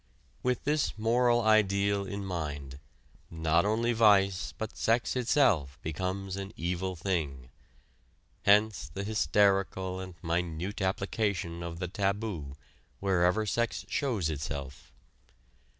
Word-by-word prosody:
With 125 -1 0
this 150 -4 0
moral 120 +2 +3
ideal 100 -2 +3
in 100 0 -4
mind, 75 -6 -5 0.5
not 80 +2 +1
only 115 +3 +1
vice, 100 -4 +4
but 110 -1 -6
sex 115 +3 +1
itself, 115 - +2
becomes 95 +4 -3
an 100 0 -6
evil 90 +2 -2
thing. 80 -8 -3 0.9
Hence 105 +1 +3
the 100 - -4
hysterical 100 -3 +1
and 95 -1 -7
minute 85 +3 -2
application 95 -2 -1
of 85 -1 -5
the 90 +1 -3
taboo 100 -7 -2 0.4
wherever 95 +2 +2
sex 120 +3 -1
shows 110 - 0
itself. 70 -2 -6
95 Hz, 110 wpm, -30 LUFS, 85-110 Hz, 0.9 s, vice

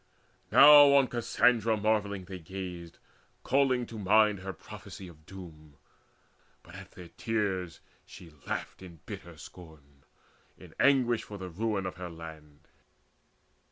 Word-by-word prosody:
Now 145 0 +8
on 135 -2 +4
Cassandra 115 -1 +1
marvelling 105 -3 -1
they 95 0 -8
gazed, 90 -1 -8 0.5
Calling 130 -2 +1
to 115 -2 -9
mind 105 0 +3
her 95 0 -6
prophecy 95 0 -11
of 80 -3 -17
doom; 80 -6 -13 0.9
But 85 - -16
at 95 -1 -12
their 90 -2 -12
tears 95 -6 -3 0.2
she 85 -3 -14
laughed - - -5
in 85 -4 -13
bitter 85 +1 -10
scorn, 70 -3 -15 0.5
In - - -15
anguish 125 -4 +3
for 105 - -10
the 95 -1 -7
ruin 105 +1 -2
of 95 - -6
her 90 -1 -7
land. 80 -3 -12
95 Hz, 130 wpm, -29 LUFS, 85-110 Hz, 0.9 s, Now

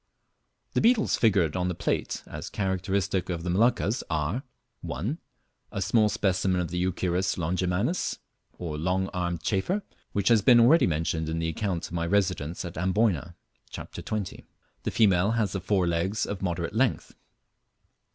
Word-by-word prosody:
The - - +2
beetles 230 -2 +4
figured 95 -9 +2
on 90 -1 0
the 90 - -2
plate - - -2
as - - -7
characteristic 95 -1 -1
of 85 -2 -3
the 90 - -1
Moluccas 110 - +2
are: 80 - -1 0.4
1. 125 - -3 0.5
A - - -3
small 105 +2 +3
specimen 95 -2 +1
of 85 -2 -2
the 90 0 -2
Euchirus 90 +1 0
longimanus, 90 - 0 0.4
or 80 -4 -4
Long 95 +3 0
armed 85 -3 -3
Chafer, 175 - 0 0.3
which 100 -1 +1
has 115 -3 +5
been 120 +4 +6
already 130 - +6
mentioned 80 -1 -1
in 80 - -2
the 80 0 -1
account 90 0 -2
of - - -9
my 85 -1 -1
residence 90 -4 0
at 85 -2 -6
Amboyna 90 -3 +1 0.3
(Chapter - - -8
XX.). 105 -3 -4 0.4
The - - -2
female 100 -1 +3
has 110 -4 +1
the 95 - -3
fore 95 0 +1
legs 85 +5 0
of 100 -2 -5
moderate 85 -1 -2
length. 125 +2 0
95 Hz, 160 wpm, -27 LUFS, 85-105 Hz, 0.5 s, been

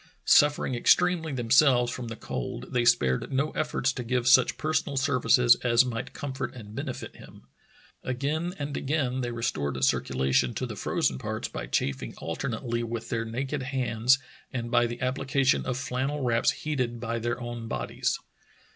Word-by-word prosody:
Suffering 145 -2 +4
extremely 165 +6 +3
themselves 125 0 +4
from 125 -2 -5
the 115 - -5
cold, 125 +2 -6
they 120 -1 +2
spared 65 - +2
no 140 +3 0
efforts 150 -3 -1
to 125 - -5
give 125 +1 -1
such 130 -1 +5
personal 155 -2 -1
services 125 -3 +4
as 120 0 +3
might 115 -2 -4
comfort 135 -3 -4
and 105 -4 -10
benefit 135 +1 -6
him. - - -14 0.6
Again 150 +8 -2
and 145 -1 -4
again 130 -3 -1
they 120 - -2
restored 70 - -2
circulation 65 -1 +1
to - - -2
the - - -6
frozen 65 - 0
parts - - -3
by - - -6
chafing 70 -1 -2
alternately 120 +6 -3
with 115 0 -5
their 115 -1 -1
naked 135 +5 -3
hands 130 -2 +2 0.3
and 120 -2 -4
by 120 - +4
the 120 +1 -6
application 135 +1 +1
of 125 - -1
flannel 135 +2 -2
wraps 115 -1 +2
heated 125 -6 -2
by 115 0 -2
their 120 +1 -2
own 120 -1 -6
bodies. 65 - -2
125 Hz, 160 wpm, -27 LUFS, 115-135 Hz, 0.6 s, such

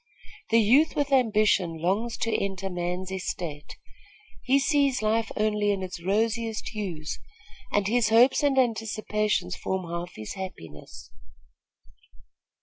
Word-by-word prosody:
The 230 - +4
youth 265 +10 +4
with 290 -1 0
ambition 215 -9 +3
longs 205 +8 -1
to 230 - 0
enter 195 -1 -2
man's 180 +1 -3
estate. 170 -5 -5 0.6
He 265 +2 +3
sees 280 -3 +2
life 220 +1 +1
only 210 -1 +1
in 195 -2 -2
its 175 -2 -7
rosiest 225 +3 -1
hues, 175 -8 -5 0.5
and 205 -1 +1
his 230 0 +2
hopes 235 +4 +5
and 285 -2 +2
anticipations 215 -5 0
form 190 -1 -3
half 170 +1 -5
his 110 0 -7
happiness." 135 - -9
210 Hz, 125 wpm, -26 LUFS, 180-230 Hz, 0.6 s, hopes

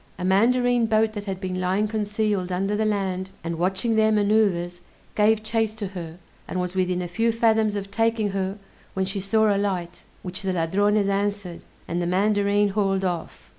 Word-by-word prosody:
A 180 - -6
mandarine 240 +4 +3
boat 220 0 +2
that 205 -1 -6
had 190 -2 -4
been 185 -1 -3
lying 190 +4 +1
concealed 210 -3 -1
under 195 +3 0
the 215 +1 0
land, 190 -3 -1
and 165 0 -4
watching 190 +6 0
their 220 0 +4
maneuvers, 200 -5 +1 0.3
gave 215 +1 +3
chase 220 -1 0
to 205 -3 -5
her, 170 -3 -8 0.3
and 185 - -3
was 180 0 -2
within 180 -1 0
a - - -4
few 225 +7 +1
fathoms 220 -2 +2
of 200 -1 -5
taking 225 -1 +1
her, 195 +1 -2 0.4
when 190 0 0
she 195 +1 -3
saw 215 +1 +2
a - - 0
light, 180 -4 -3 0.2
which 180 0 -5
the 190 -1 -1
Ladrones 200 +5 +1
answered, 200 -3 -2 0.2
and 175 +1 -2
the 175 - -1
Mandarine 205 +2 +2
hauled 195 -1 0
off. 175 -3 -4
200 Hz, 185 wpm, -24 LUFS, 185-215 Hz, 0.4 s, their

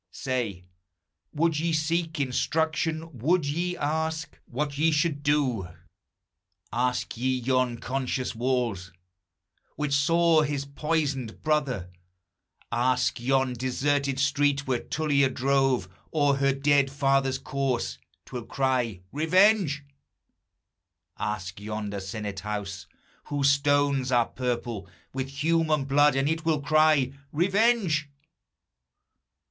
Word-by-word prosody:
Say, 115 -8 -3 0.7
would 160 0 +1
you 165 +1 0
seek 165 +1 -1
instruction? 160 +3 -1
would 165 +6 +2
ye 175 +5 -2
ask 160 +2 -2
What 140 +3 -3
ye 160 +2 +4
should 155 -2 +1
do? 140 -9 +1 1.1
Ask 125 +2 -1
ye 130 +2 0
yon 130 -1 +1
conscious 130 +1 -2
walls, 115 -6 -1 0.8
Which 150 -2 -2
saw 165 +3 +4
his 145 -2 -2
poisoned 140 -5 -2
brother, 135 - 0 0.8
Ask 125 +1 +1
yon 130 +1 +1
deserted 135 +2 0
street, 140 0 +2
where 130 -2 0
Tullia 145 -3 +1
drove 135 -5 +1 0.2
O'er 145 -3 +2
her 140 0 +3
dead 140 0 +2
father's 135 -1 +1
corse, 130 - -2 0.3
't - - -17
will 120 -2 -4
cry, 125 -8 0
Revenge! 165 -1 +3 1.4
Ask 100 -3 -4
yonder 105 -1 -4
senate 100 0 -5
house, 100 -3 -5 0.4
whose 140 -1 +2
stones 140 -2 +2
are 120 -2 +3
purple 120 -5 -3 0.2
With 135 0 -2
human 155 +1 +1
blood, 145 +1 +4
and 135 +1 +1
it 160 +1 -1
will 160 -3 +1
cry, 155 -2 +3 0.2
Revenge! 190 -3 +2
140 Hz, 110 wpm, -27 LUFS, 125-155 Hz, 1.4 s, ye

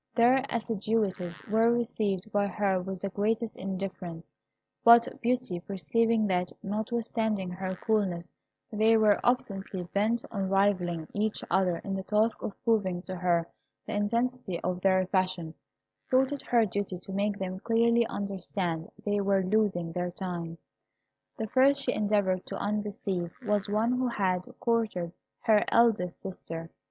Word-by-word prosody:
Their 250 +3 +5
assiduities 210 -6 -1
were 225 +2 +3
received 215 -4 -1
by 205 0 +2
her 195 -2 0
with 190 0 -6
the 195 - -1
greatest 220 +3 -1
indifference; 185 -3 -5 0.5
but 235 0 +8
Beauty 245 -7 0
perceiving 215 +5 +1
that, 180 -2 0
notwithstanding 220 -2 -1
her 185 +1 -4
coolness, 185 -4 -1 0.4
they 220 +1 +4
were 215 -2 +4
obstinately 195 -6 0
bent 210 +6 0
on 195 -3 -2
rivalling 180 -5 +1
each 215 +1 -1
other 185 -3 +2
in 195 -1 -3
the 190 - -2
task 215 +3 +1
of 200 - -4
proving 190 -6 +1
to 185 - -6
her 175 -2 +1 0.4
the - - -5
intensity 230 -2 -1
of 180 0 -2
their 185 -1 +3
passion, 185 -3 -1 0.6
thought 260 +1 +3
it 285 - -3
her 235 -2 +3
duty 200 -2 -3
to 185 - -10
make 200 +1 0
them 185 -1 -4
clearly 235 +2 +3
understand 190 -4 -3 0.2
they 205 0 +1
were 195 -1 +2
losing 185 -4 +1
their 180 +1 -2
time. 175 -2 -5 0.8
The 220 - -2
first 270 +5 +4
she 250 - 0
endeavoured 200 -3 +1
to - - -5
undeceive 200 -4 -2
was 205 -1 0
one 215 +3 +2
who 250 0 +1
had 185 -6 -1
courted 220 -8 0 0.3
her 215 -3 +4
eldest 220 -7 +2
sister. 165 -3 -7
200 Hz, 145 wpm, -29 LUFS, 185-225 Hz, 0.8 s, but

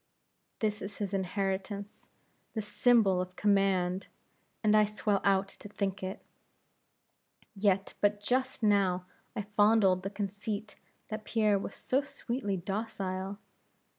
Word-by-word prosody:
"This 210 -1 0
is 195 - -6
his 200 -2 -3
inheritance 195 +2 -2 0.5
this 215 -2 -3
symbol 210 -7 +4
of 185 0 -6
command! 195 -2 +2 0.6
and 215 0 +5
I 215 - +7
swell 210 -1 0
out 195 0 +3
to 205 - -10
think 200 -1 -2
it. 190 +1 -5 1.3
Yet 195 -1 +1
but 205 0 +3
just 255 +3 0
now 195 -4 +3 0.3
I 210 - -2
fondled 205 -2 +4
the 195 - -3
conceit 205 +1 -4 0.3
that 215 0 -4
Pierre 215 -3 +2
was 195 - -6
so 265 +2 +1
sweetly 235 -7 -3
docile! 195 0 -3
200 Hz, 125 wpm, -31 LUFS, 195-215 Hz, 1.3 s, I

